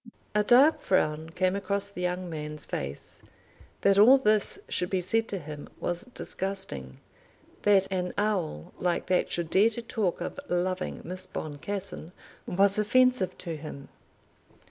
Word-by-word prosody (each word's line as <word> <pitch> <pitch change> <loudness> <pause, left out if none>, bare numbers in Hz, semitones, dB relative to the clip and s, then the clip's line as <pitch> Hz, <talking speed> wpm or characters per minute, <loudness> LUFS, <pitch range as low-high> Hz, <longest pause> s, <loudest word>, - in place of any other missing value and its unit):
A 210 0 +3
dark 260 +8 +6
frown 155 -3 +1
came 185 +3 0
across 200 0 0
the 200 -3 -8
young 180 0 -1
man's 150 -2 -6
face. 70 +1 -5 0.6
That 200 0 +4
all 250 +6 +9
this 215 -5 +2
should 180 - -1
be 190 - +1
said 225 +6 +1
to 200 - -3
him 150 -3 -8
was 175 +3 -2
disgusting. 190 - -5 0.6
That 200 -2 +4
an 180 -1 -1
owl 190 - -1
like 175 -1 0
that 185 - +1
should 170 -2 -2
dare 205 +4 +5
to 230 +1 -5
talk 210 -6 -1
of - - -5
loving 185 +1 -1
Miss 185 +2 -2
Boncassen 170 +3 -5 0.3
was 200 +3 +4
offensive 250 -1 +3
to 170 -3 -4
him. 150 -2 -9
185 Hz, 145 wpm, -28 LUFS, 170-205 Hz, 0.6 s, all